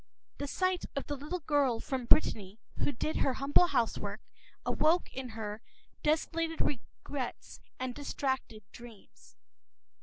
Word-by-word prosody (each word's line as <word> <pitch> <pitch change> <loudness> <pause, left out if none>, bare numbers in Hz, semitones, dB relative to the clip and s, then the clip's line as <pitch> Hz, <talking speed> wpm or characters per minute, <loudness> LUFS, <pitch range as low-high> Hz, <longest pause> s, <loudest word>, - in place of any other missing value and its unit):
The 285 - -2
sight 370 +4 +1
of 275 - -1
the 290 - -2
little 300 +6 -4
girl 280 -6 +3
from 260 -1 -2
Brittany 210 -6 +3 0.2
who - - +2
did 305 +5 -2
her 265 - +2
humble 285 +6 +5
housework 240 -8 0 0.5
awoke 330 +3 +3
in 260 -1 -4
her 220 -1 -5 0.4
desolated 325 +1 +1
regrets 265 0 -3 0.2
and 255 -1 -2
distracted 265 -5 -2
dreams. 235 -4 -14
275 Hz, 125 wpm, -32 LUFS, 240-305 Hz, 0.5 s, humble